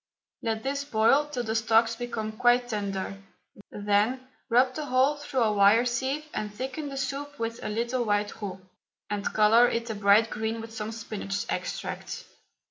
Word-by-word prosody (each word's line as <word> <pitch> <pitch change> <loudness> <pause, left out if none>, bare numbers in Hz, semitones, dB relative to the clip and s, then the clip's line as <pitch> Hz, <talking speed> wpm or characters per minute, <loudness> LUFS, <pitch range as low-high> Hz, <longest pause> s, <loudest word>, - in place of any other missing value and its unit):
Let 220 -1 -2
this 280 +1 -1
boil 275 +3 +3
till 265 -5 -3
the 220 -1 -2
stalks 225 0 +3
become 230 -2 -4
quite 245 +2 +3
tender, 195 -2 -3 0.5
then 210 +6 0 0.2
rub 250 +2 +4
the 300 0 -5
whole 265 +3 +3
through 275 -4 -1
a 220 - +2
wire 205 +4 +5
sieve 265 +5 -1
and 210 -1 -3
thicken 265 +7 -5
the 275 - -6
soup 275 +2 -4
with 230 -1 -4
a - - -3
little 235 +3 -1
white 205 -1 -1
roux, 190 -2 -5 0.5
and 205 -1 -1
colour 220 +3 +6
it 230 0 -2
a - - -2
bright 205 +2 +4
green 220 +1 -2
with 225 0 -8
some 220 0 -4
spinach 215 -3 -4
extract. - - -4
230 Hz, 170 wpm, -27 LUFS, 215-255 Hz, 0.5 s, colour